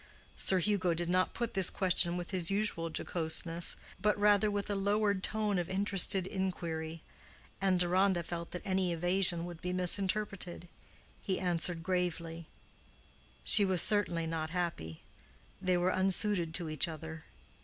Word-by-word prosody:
Sir 190 Hz, -, +1 dB
Hugo 185 Hz, -2 st, +1 dB
did 175 Hz, +1 st, -3 dB
not 185 Hz, +1 st, +1 dB
put 235 Hz, -1 st, -3 dB
this 190 Hz, -2 st, +5 dB
question 180 Hz, -2 st, +3 dB
with 175 Hz, +1 st, -6 dB
his 180 Hz, -3 st, 0 dB
usual 195 Hz, -5 st, 0 dB
jocoseness, 165 Hz, +1 st, 0 dB, 0.3 s
but 210 Hz, 0 st, +1 dB
rather 210 Hz, 0 st, +3 dB
with 205 Hz, -1 st, -3 dB
a -, -, 0 dB
lowered 200 Hz, 0 st, 0 dB
tone 210 Hz, -2 st, -1 dB
of 175 Hz, -, -4 dB
interested 195 Hz, -1 st, +3 dB
inquiry; 165 Hz, -4 st, -4 dB, 0.6 s
and 190 Hz, -2 st, +2 dB
Deronda 180 Hz, 0 st, +1 dB
felt 170 Hz, 0 st, -6 dB
that 180 Hz, -, -7 dB
any 190 Hz, -2 st, 0 dB
evasion 175 Hz, 0 st, 0 dB
would 175 Hz, -2 st, -9 dB
be 180 Hz, 0 st, -3 dB
misinterpreted. 185 Hz, -1 st, 0 dB, 0.5 s
He 190 Hz, -, -2 dB
answered 175 Hz, -2 st, -1 dB
gravely, 170 Hz, -2 st, -3 dB, 1.0 s
"She 210 Hz, -, +5 dB
was 190 Hz, -3 st, +3 dB
certainly 180 Hz, -6 st, +3 dB
not 160 Hz, -1 st, -3 dB
happy. 165 Hz, -, -4 dB, 0.6 s
They 185 Hz, -1 st, +1 dB
were 180 Hz, +1 st, +1 dB
unsuited 190 Hz, -2 st, +1 dB
to 170 Hz, -3 st, -2 dB
each 155 Hz, -, +1 dB
other. 160 Hz, -1 st, -8 dB
180 Hz, 145 wpm, -32 LUFS, 170-195 Hz, 1.0 s, this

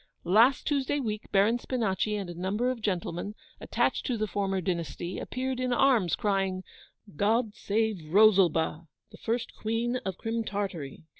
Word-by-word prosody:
'Last 225 Hz, +9 st, +4 dB
Tuesday 290 Hz, 0 st, 0 dB
week 215 Hz, -5 st, -4 dB
Baron 210 Hz, +4 st, +3 dB
Spinachi 215 Hz, -4 st, -1 dB
and 195 Hz, -, -5 dB
a 175 Hz, -, -6 dB
number 200 Hz, +8 st, -1 dB
of 245 Hz, -3 st, -6 dB
gentlemen, 190 Hz, 0 st, -2 dB, 0.2 s
attached -, -, 0 dB
to 250 Hz, -4 st, 0 dB
the 215 Hz, -, 0 dB
former 195 Hz, -1 st, -1 dB
dynasty, 175 Hz, 0 st, -3 dB
appeared 255 Hz, 0 st, -3 dB
in 255 Hz, 0 st, -1 dB
arms, 245 Hz, -9 st, +3 dB
crying, 195 Hz, -2 st, 0 dB, 0.5 s
"God 215 Hz, +4 st, +1 dB
save 205 Hz, -7 st, -2 dB
Rosalba, 175 Hz, -6 st, +4 dB, 0.2 s
the -, -, -12 dB
first 230 Hz, +1 st, -2 dB
Queen 230 Hz, +3 st, -1 dB
of 190 Hz, -7 st, -5 dB
Crim 230 Hz, 0 st, -2 dB
Tartary!" 190 Hz, -10 st, -4 dB
210 Hz, 150 wpm, -28 LUFS, 185-235 Hz, 0.5 s, Last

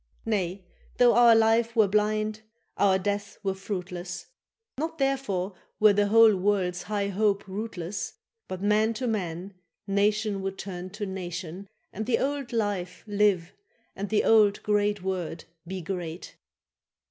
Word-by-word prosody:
—Nay, 190 Hz, -4 st, -1 dB, 0.3 s
though 245 Hz, -1 st, +6 dB
our 235 Hz, -1 st, +7 dB
life 225 Hz, +1 st, +3 dB
were 220 Hz, -3 st, +5 dB
blind, 215 Hz, +1 st, 0 dB, 0.3 s
our 195 Hz, -2 st, +4 dB
death 205 Hz, +1 st, -3 dB
were 195 Hz, -1 st, 0 dB
fruitless, 180 Hz, -2 st, -5 dB, 0.5 s
Not 320 Hz, +1 st, -3 dB
therefore 260 Hz, -9 st, -1 dB, 0.3 s
were 215 Hz, -1 st, +7 dB
the 205 Hz, 0 st, +2 dB
whole 225 Hz, 0 st, +7 dB
world's 185 Hz, -2 st, 0 dB
high 205 Hz, -1 st, -2 dB
hope 200 Hz, 0 st, +1 dB
rootless; 195 Hz, -2 st, -5 dB, 0.3 s
But 185 Hz, +1 st, -6 dB
man 215 Hz, +2 st, +2 dB
to 255 Hz, -, -3 dB
man, 190 Hz, -4 st, -3 dB, 0.3 s
nation 205 Hz, 0 st, +1 dB
would 195 Hz, 0 st, -4 dB
turn 185 Hz, -2 st, -6 dB
to 210 Hz, -, -2 dB
nation, 185 Hz, 0 st, -6 dB, 0.2 s
And 215 Hz, +2 st, -4 dB
the 245 Hz, -, +3 dB
old 275 Hz, -2 st, -2 dB
life 200 Hz, -6 st, -2 dB
live, 205 Hz, -5 st, +1 dB, 0.4 s
and 200 Hz, 0 st, -4 dB
the 215 Hz, -, +2 dB
old 210 Hz, -2 st, +4 dB
great 205 Hz, -1 st, +1 dB
word 180 Hz, -4 st, -3 dB, 0.2 s
be 185 Hz, -1 st, -5 dB
great. 175 Hz, -1 st, -5 dB
205 Hz, 140 wpm, -27 LUFS, 185-215 Hz, 0.5 s, our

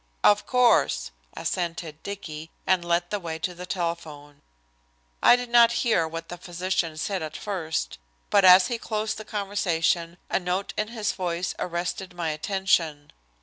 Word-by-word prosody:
"Of 205 Hz, 0 st, +4 dB
course," 245 Hz, -, +3 dB, 0.3 s
assented 165 Hz, -3 st, -3 dB
Dicky, 160 Hz, -6 st, -7 dB, 0.2 s
and 185 Hz, -2 st, +2 dB
led 175 Hz, 0 st, 0 dB
the 205 Hz, -, -1 dB
way 165 Hz, -3 st, -5 dB
to 180 Hz, +2 st, -3 dB
the 180 Hz, +1 st, -9 dB
telephone. 155 Hz, -5 st, -4 dB, 0.8 s
I -, -, +8 dB
did 245 Hz, -1 st, -4 dB
not 235 Hz, -1 st, +7 dB
hear 195 Hz, -9 st, +3 dB
what 165 Hz, +1 st, -6 dB
the 175 Hz, -, -8 dB
physician 175 Hz, -2 st, -2 dB
said 190 Hz, +3 st, -2 dB
at 155 Hz, 0 st, -5 dB
first, 165 Hz, -, -3 dB, 0.3 s
but 200 Hz, -1 st, +5 dB
as 185 Hz, 0 st, +9 dB
he 235 Hz, +2 st, -2 dB
closed 215 Hz, -1 st, -2 dB
the 215 Hz, -, -8 dB
conversation 175 Hz, -5 st, 0 dB
a -, -, +1 dB
note 180 Hz, +2 st, -2 dB
in 215 Hz, -, -1 dB
his 220 Hz, -2 st, -2 dB
voice 180 Hz, -1 st, -2 dB
arrested 180 Hz, +1 st, -3 dB
my 170 Hz, -2 st, -1 dB
attention. 160 Hz, -3 st, 0 dB
180 Hz, 155 wpm, -26 LUFS, 165-200 Hz, 0.8 s, as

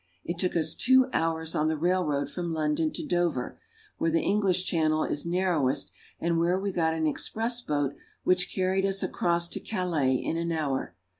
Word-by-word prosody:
It 170 Hz, 0 st, -4 dB
took 180 Hz, -, 0 dB
us 160 Hz, -1 st, +1 dB
two 260 Hz, +1 st, +4 dB
hours 160 Hz, 0 st, 0 dB
on 150 Hz, -, +1 dB
the 160 Hz, 0 st, 0 dB
railroad 165 Hz, -4 st, +1 dB
from 175 Hz, -2 st, -4 dB
London 155 Hz, 0 st, 0 dB
to -, -, -4 dB
Dover, 170 Hz, -8 st, -1 dB, 0.4 s
where 165 Hz, -, +2 dB
the 165 Hz, +1 st, +2 dB
English 190 Hz, -3 st, +2 dB
Channel 155 Hz, -3 st, +1 dB
is 145 Hz, +3 st, -2 dB
narrow 175 Hz, -5 st, +1 dB
est 130 Hz, -, -1 dB, 0.3 s
and 170 Hz, 0 st, +1 dB
where 175 Hz, +2 st, +2 dB
we 200 Hz, 0 st, -2 dB
got 160 Hz, -3 st, +1 dB
an 160 Hz, -1 st, 0 dB
express 230 Hz, +9 st, -1 dB
boat 145 Hz, -, -1 dB, 0.3 s
which 180 Hz, 0 st, +2 dB
carried 190 Hz, 0 st, +1 dB
us 195 Hz, 0 st, 0 dB
across 170 Hz, 0 st, 0 dB
to -, -, -3 dB
Calais 170 Hz, -10 st, 0 dB
in 165 Hz, -, -2 dB
an 170 Hz, 0 st, -1 dB
hour. 145 Hz, -5 st, -2 dB
170 Hz, 190 wpm, -28 LUFS, 155-185 Hz, 0.4 s, two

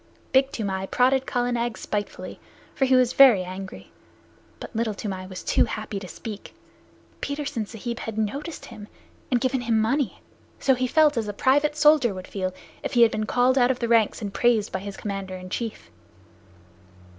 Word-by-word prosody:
Big 265 Hz, +1 st, +4 dB
Toomai 195 Hz, -3 st, -3 dB
prodded 260 Hz, +3 st, +2 dB
Kala 245 Hz, -1 st, 0 dB
Nag 240 Hz, -1 st, -1 dB
spitefully, 205 Hz, -1 st, -5 dB, 0.3 s
for 270 Hz, -, +1 dB
he 260 Hz, 0 st, +4 dB
was 255 Hz, -1 st, +3 dB
very 245 Hz, -9 st, +7 dB
angry, 185 Hz, +1 st, -8 dB, 0.7 s
but -, -, -9 dB
Little 220 Hz, -2 st, -1 dB
Toomai 190 Hz, -3 st, -5 dB
was 185 Hz, -1 st, -8 dB
too -, -, +3 dB
happy 215 Hz, -2 st, -5 dB
to 190 Hz, -, -9 dB
speak. 210 Hz, +2 st, -8 dB, 0.7 s
Petersen 285 Hz, -6 st, -3 dB
Sahib 235 Hz, +2 st, -5 dB
had 225 Hz, -1 st, -6 dB
noticed 275 Hz, +10 st, -3 dB
him, 215 Hz, -3 st, -10 dB, 0.4 s
and 245 Hz, -, +2 dB
given 260 Hz, 0 st, 0 dB
him 230 Hz, -2 st, +1 dB
money, 250 Hz, +5 st, 0 dB, 0.4 s
so 270 Hz, -, +3 dB
he 255 Hz, 0 st, 0 dB
felt 300 Hz, 0 st, +4 dB
as 220 Hz, -2 st, -1 dB
a 205 Hz, -, -3 dB
private 290 Hz, +7 st, +2 dB
soldier 300 Hz, -8 st, +4 dB
would 185 Hz, 0 st, -7 dB
feel 185 Hz, -2 st, -3 dB, 0.3 s
if -, -, -4 dB
he 240 Hz, -2 st, +6 dB
had 225 Hz, -, +5 dB
been 215 Hz, 0 st, -2 dB
called 255 Hz, +3 st, +3 dB
out 245 Hz, 0 st, +4 dB
of 260 Hz, -, +1 dB
the 235 Hz, -, -2 dB
ranks 225 Hz, -1 st, +2 dB
and 200 Hz, -1 st, -4 dB
praised 230 Hz, -3 st, +2 dB
by 190 Hz, -, -2 dB
his 200 Hz, +1 st, -7 dB
commander 195 Hz, -2 st, -5 dB
in 185 Hz, 0 st, -9 dB
chief. 225 Hz, -, -5 dB
230 Hz, 185 wpm, -25 LUFS, 205-260 Hz, 0.7 s, very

